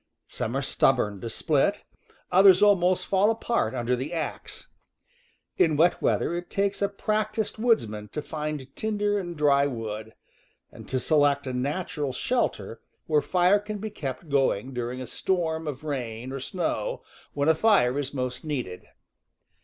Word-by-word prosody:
Some 120 +4 -3
are 140 - -1
stub 135 0 +3
born 105 -5 -3
to 115 - -4
split, - - +1 0.5
others 190 +1 +7
almost 185 -3 +4
fall 195 +2 +3
apart 225 - 0
under 120 +1 0
the 135 +7 -5
axe. 160 -2 -5 0.9
In 155 -3 +3
wet 170 +3 +3
weather - - +1
it 175 0 -4
takes 200 0 -1
a 200 - +2
practiced 215 +1 -2
woodsman 110 - +1
to 150 - -5
find 150 -3 -5
tinder 205 -1 0
and 175 -3 -6
dry 140 -1 +4
wood, 110 -3 -6 0.6
and - - -12
to 130 - 0
select 145 0 +2
a 130 - -3
natural 145 +1 -2
shelter 125 - -2 0.2
where 150 -2 +2
fire 180 +4 +3
can 210 +1 -6
be 215 +1 -5
kept 140 -3 -6
going 135 -4 +1
during 125 +1 -3
a - - -4
storm 160 0 -1
of 145 -1 -5
rain 125 -4 -4
or 135 - -4
snow, 185 - -3 0.3
when 145 +1 0
a 160 - +6
fire 155 - +3
is 140 -1 -3
most 125 -2 -4
needed. 125 - -4
150 Hz, 160 wpm, -26 LUFS, 130-190 Hz, 0.9 s, others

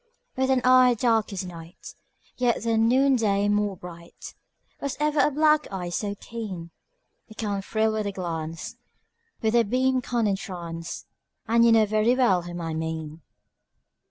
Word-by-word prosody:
With 265 0 0
an 260 -1 +3
eye 255 -1 +6
dark 225 -2 +1
as 190 -1 -4
night, 170 -1 -11 0.4
Yet 245 -3 0
than 225 -1 +2
noonday 235 -6 +3
more 205 -2 0
bright, 170 -1 -11 0.5
Was 280 - -3
ever 300 0 +1
a 285 - +4
black 300 -1 +2
eye 180 -2 -4
so 200 +3 -3
keen? 195 -7 -7 0.6
It 220 - -15
can 205 -3 -2
thrill 220 +2 0
with 215 -1 -2
a - - -2
glance, 170 +4 -5 0.7
With 220 0 +1
a 240 - +5
beam 255 +4 +1
can 240 -2 -1
entrance, 175 -5 -4 0.4
And 230 +1 +4
you 235 - +6
know 225 -1 +5
very 215 +3 +2
well 235 -9 +3
whom 175 0 -7
I 165 -1 -3
mean. 160 0 -5
215 Hz, 155 wpm, -25 LUFS, 180-240 Hz, 0.7 s, eye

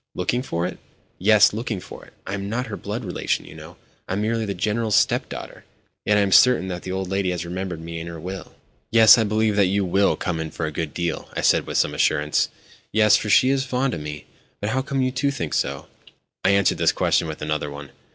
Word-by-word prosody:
"Looking 110 +7 -1
for 85 -9 -3
it?" 90 - -5 0.4
"Yes, 105 +2 +5
looking 110 -2 -3
for - - -11
it. - - -20
I 95 - -5
am 100 0 -4
not 125 +4 -2
her 110 -4 -6
blood 105 +3 -5
relation, 90 - -2
you - - -12
know—I - - -11
am 100 - -1
merely 115 0 0
the 100 - -3
General's 105 +4 0
step - - +2
daughter. - - -8 0.4
Yet 105 0 +3
I - - +4
am 100 -1 0
certain 120 -4 +5
that 90 -1 -5
the 95 - -6
old 95 0 -3
lady 95 0 -1
has 90 -1 -3
remembered 90 -1 -5
me 85 0 -6
in 80 - -7
her 85 -1 -7
will." 95 +3 -8 0.3
"Yes, 115 +1 +7
I - - +3
believe 110 0 +1
that 100 -2 +4
you 100 +1 0
will 95 +3 +2
come 85 -3 -3
in 80 -1 -4
for - - -4
a 80 - -3
good 75 -1 -4
deal," 85 -2 -3
I - - -1
said - - +3
with - - -2
some - - +2
assurance. 75 0 +1 0.4
"Yes, 105 -1 +5
for 105 - -1
she 130 +5 +5
is 135 -1 +1
fond 130 -1 -1
of 80 - -4
me. 75 0 -7 0.3
But 105 +1 -2
how 130 +2 0
come 135 0 -1
you 130 - 0
to 135 +2 0
think 85 - -4
so?" - - -1 0.6
I - - +3
answered 100 -1 +2
this - - +4
question - - +1
with 75 -1 -6
another 75 -1 -2
one. 70 -1 -9
100 Hz, 240 wpm, -23 LUFS, 85-110 Hz, 0.6 s, Yes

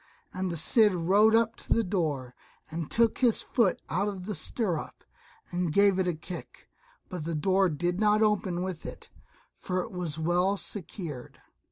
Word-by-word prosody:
And 185 -1 -2
the 170 - -3
Cid 210 +5 +4
rode 200 +6 +4
up 230 0 +2
to - - -1
the 230 - +2
door, 155 - -2 0.4
and 165 -1 -4
took 230 -1 +2
his 240 -4 +3
foot 230 -8 +1
out 205 - 0
of 190 -3 -5
the 210 - -3
stirrup, 190 -5 -2 0.5
and 175 -2 -1
gave 200 +2 +4
it 185 - +1
a 175 - 0
kick, 175 +3 -9 0.4
but 180 -4 -6
the 165 +1 -3
door 190 +4 +2
did 175 +4 -2
not 215 0 +3
open 190 -4 0
with 185 -3 -5
it, - - -9 0.5
for 185 0 -2
it - - -9
was 175 -5 -3
well 175 +5 +1
secured. 165 - -6
185 Hz, 175 wpm, -28 LUFS, 170-210 Hz, 0.5 s, Cid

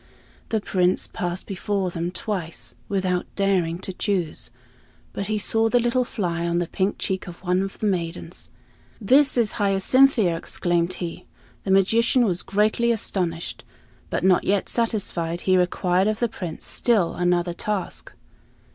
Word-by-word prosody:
The 220 - +1
Prince 185 -3 +1
passed 175 +1 -4
before 195 -1 -2
them 170 0 -2
twice, 185 -3 -5 0.2
without 185 -2 0
daring 185 -4 +1
to 190 - -6
choose; 180 -5 -2 0.6
but 200 - -3
he 215 0 0
saw 225 +2 +1
the 245 - +4
little 240 +1 +1
fly 170 -6 -2
on 170 0 0
the 175 - +1
pink 190 +4 -1
cheek 190 -1 -2
of 175 -1 -9
one 180 0 +1
of 195 0 -4
the - - -3
maidens. 175 -3 -2 0.5
"This 265 +6 +4
is 230 -3 +3
Hyacinthia!" 200 0 +4
exclaimed 175 +1 0
he. 175 -2 -6 0.4
The - - -3
magician 225 +6 +4
was 180 -4 0
greatly 215 +4 +2
astonished; 180 -6 -2 0.5
but - - -2
not 185 -1 +4
yet 200 0 +1
satisfied, 180 -7 0
he 185 - +3
required 180 +1 +2
of 215 0 0
the 240 - +1
Prince 180 -7 -6
still 215 -8 +1
another 175 0 +1
task. 200 +2 -3
190 Hz, 150 wpm, -24 LUFS, 175-215 Hz, 0.6 s, the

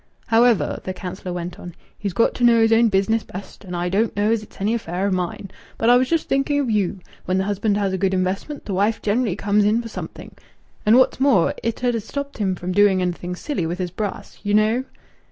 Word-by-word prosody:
"However," 230 -2 +3
the 185 - -4
councillor 185 0 -6
went 175 0 -5
on, 175 -2 -9 0.2
"he's 200 -2 -4
got 230 - +2
to 245 - -3
know 235 -1 +6
his 225 0 +4
own 230 0 +5
business 205 +3 +2
best. 195 +1 -10
And 180 -2 -6
I 175 0 -1
don't 205 +5 0
know 205 +2 +2
as 225 -1 +1
it's 210 - -15
any 205 +3 +1
affair 190 -4 -2
o' 200 - +1
mine. 185 +1 -3 0.3
But 230 +1 +3
I - - +7
was 255 +1 +2
just 330 -1 0
thinking 275 +2 +1
of 265 -5 0
you. 195 -3 0 0.2
When 185 +1 0
the 190 - +1
husband 205 +1 0
has 200 -2 0
a 190 - -2
good 190 0 +1
investment, 190 +11 -2
th' - - -5
wife 205 +4 0
generally 215 -2 +1
comes 205 +1 +2
in 210 +3 +3
for 230 -1 -6
something.... - - -8 0.6
And 225 +3 +7
what's 260 - +3
more, 265 -11 +3
it 230 +2 -3
'ud 245 -1 +2
ha' 230 - 0
stopped 280 +5 -6
him 190 -3 0
from 180 +1 -4
doing 200 0 +4
anything 180 0 -2
silly 180 - -3
with 175 +2 -3
his 180 -2 -3
brass! 205 +2 -5
You 205 0 0
know." 220 +4 +2
205 Hz, 240 wpm, -22 LUFS, 185-230 Hz, 0.6 s, I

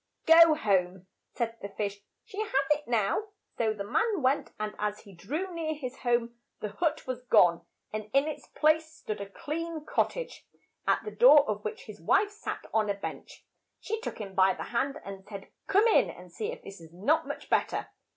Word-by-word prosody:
"Go 325 -1 +8
home," 190 - 0 0.3
said 230 -1 -2
the 200 - -5
fish, 200 0 -3 0.3
"she 430 -2 -8
has 435 - -3 0.2
it 300 0 +1
now." 225 - +1 0.4
So 225 -2 +2
the 210 -2 -4
man 410 - 0
went, 265 +3 +2
and 215 0 -3
as 210 0 -2
he 200 - -15
drew 305 - -4
near 320 -2 -2
his 265 -3 -6
home, 240 -1 0 0.2
the 210 - -3
hut 315 - -1
was 255 -1 -4
gone, 170 -7 +5 0.3
and 215 0 -4
in 275 +2 +3
its 310 - -6
place 315 +1 +2
stood 215 -10 -6
a 200 - -6
clean 315 +6 -5
cot - - +2
tage, - - -8 0.4
at - - +2
the 430 - -4
door 300 - +7
of 210 0 -2
which 210 - -5
his 210 -5 -11
wife 400 - +3
sat 420 +2 -6
on 215 -2 +2
a 200 - +1
bench. 195 - -8 0.3
She 445 +1 -4
took - - -5
him 200 -3 -7
by 190 0 +4
the - - -5
hand 275 +4 0
and 195 -1 -8
said, 200 -2 -9 0.2
"Come 405 +3 +4
in 455 - +5
now - - -8
and - - -13
see 440 +1 -3
if - - -9
this 195 -3 -10
is 160 -1 -13
not 285 - +1
much - - -6
bet - - +2
ter." - - -4
245 Hz, 210 wpm, -29 LUFS, 200-320 Hz, 0.4 s, Go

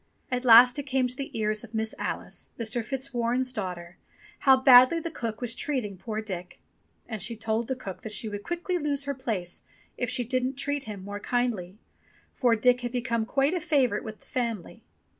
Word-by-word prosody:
At 250 0 -1
last 245 +3 +8
it 285 - -5
came 265 -1 +2
to 250 0 -2
the 275 +1 -5
ears 215 0 0
of 230 -1 -10
Miss 220 0 -1
Alice, - - -5
Mr. 230 +1 -2
Fitzwarren's 250 0 -1
daughter, 180 -5 -5 0.4
how 265 -2 +6
badly 260 +4 +7
the 330 0 -5
cook 230 -6 -5
was 240 -2 0
treating 250 -7 -2
poor 215 +3 -4
Dick. 180 -4 -6 0.5
And 220 -3 -5
she 230 +4 -2
told 220 +1 -1
the 260 - -1
cook 195 -7 -8
that 220 - -6
she 220 +2 0
would 205 -1 -5
quickly 345 - -2
lose 285 -2 -1
her 280 0 -2
place 220 -10 -4 0.4
if 245 - -1
she 245 - +1
didn't 255 +2 -1
treat 280 +1 -2
him 205 -3 -7
more 205 0 -5
kindly, 215 -6 -1 0.6
for 240 -3 +3
Dick 250 +3 +3
had 240 -1 -3
become 235 -2 -1
quite 275 +5 +2
a 360 - 0
favourite 260 -9 +1
with 220 -1 -8
the - - -18
family. 230 -7 -3
240 Hz, 195 wpm, -27 LUFS, 215-260 Hz, 0.6 s, last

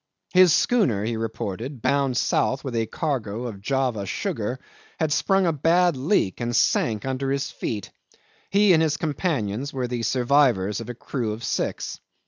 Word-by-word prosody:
His 185 -2 +7
schooner, 145 - +2
he 115 +1 -1
reported, 115 +3 -5
bound 140 -3 +1
south 130 - +1
with 130 -4 -4
a 115 -1 0
cargo 120 -8 -3
of 105 -5 -6
Java 125 -4 -1
sugar, 115 +6 -3 0.4
had 155 -2 +1
sprung 195 +4 +2
a 165 - +2
bad 170 +3 +3
leak 130 - 0
and 120 0 -1
sank 110 -1 +2
under 135 0 -2
his 140 0 -1
feet. 105 -3 -5 0.6
He 200 -1 +5
and 160 - +4
his 155 -2 +1
companions 140 - -2
were 130 -2 -2
the 120 -1 -3
survivors 120 -5 +2
of 115 - -8
a 120 - -5
crew 115 -2 -3
of 110 +2 -8
six. - - -2
130 Hz, 165 wpm, -24 LUFS, 115-150 Hz, 0.6 s, His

